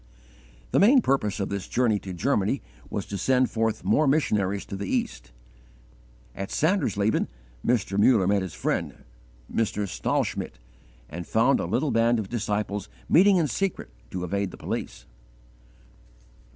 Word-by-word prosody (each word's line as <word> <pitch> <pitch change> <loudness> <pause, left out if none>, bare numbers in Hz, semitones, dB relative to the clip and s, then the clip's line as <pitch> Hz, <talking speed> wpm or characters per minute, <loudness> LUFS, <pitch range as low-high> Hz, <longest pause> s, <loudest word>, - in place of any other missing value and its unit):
The - - +3
main 245 +5 +6
purpose 110 -7 0
of 100 - -2
this 100 -1 -4
journey 115 -4 +1
to 95 - -8
Germany 90 -3 0 0.3
was - - -3
to 100 - -5
send 130 -1 +2
forth 110 -3 -1
more 110 +11 +3
missionaries 105 -9 +1
to - - -6
the 100 0 -4
East. - - -2 1.0
At 95 +6 -5
Sandersleben 110 - +1 0.4
Mr. 100 -5 +1
Muller 105 -3 +5
met 100 +1 +2
his 95 -4 -6
friend, - - -2 0.5
Mr. 105 -2 0
Stahlschmidt, - - -2 0.5
and 85 +6 -7
found 115 +5 +3
a - - -1
little 145 +2 0
band 115 +1 +3
of 105 -3 -4
disciples 105 - -2 0.2
meeting 190 +3 +6
in 170 - +3
secret 195 - -2 0.2
to 90 -1 -4
evade 100 +2 -1
the - - -11
police. - - -5
105 Hz, 145 wpm, -26 LUFS, 100-130 Hz, 1.0 s, main